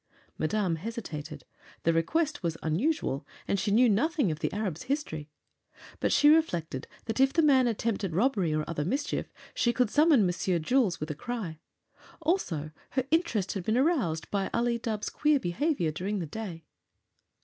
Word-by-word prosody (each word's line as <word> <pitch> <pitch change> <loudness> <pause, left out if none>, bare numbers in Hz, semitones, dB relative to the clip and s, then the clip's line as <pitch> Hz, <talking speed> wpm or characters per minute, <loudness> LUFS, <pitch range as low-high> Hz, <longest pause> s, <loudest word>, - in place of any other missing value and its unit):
Madame 180 0 0
hesitated. 155 - -6 0.4
The 165 - +3
request 305 - 0
was 165 -3 -2
unusual, 165 - 0 0.2
and 200 - +1
she 205 - -1
knew 235 +5 +5
nothing 275 - +2
of 155 - -4
the - - -1
Arab's 195 -6 -3
history. 160 - -2 0.7
But - - +1
she 295 - +5
reflected 175 - +1 0.2
that 225 +2 -3
if 270 0 +5
the 330 - +2
man 265 -4 +5
attempted 215 -6 -1
robbery 200 - +2
or 155 0 -1
other 160 -3 -2
mischief 275 - -2 0.2
she 240 - +2
could 240 -2 +1
summon 295 - +5
Monsieur 180 0 0
Jules 200 +3 +1
with 150 +1 -3
a - - -2
cry. 185 -3 -5 0.6
Also, 245 - -1 0.2
her 260 -1 -1
interest 275 - +1
had 195 - -4
been 220 +5 +1
aroused 250 - +1
by 195 -1 0
Ali 235 0 +1
Dubh's 220 -2 -3
queer 300 -1 +2
behavior 175 - 0
during 190 +7 -3
the 175 - -2
day. 170 -2 -7
210 Hz, 165 wpm, -29 LUFS, 165-265 Hz, 0.7 s, knew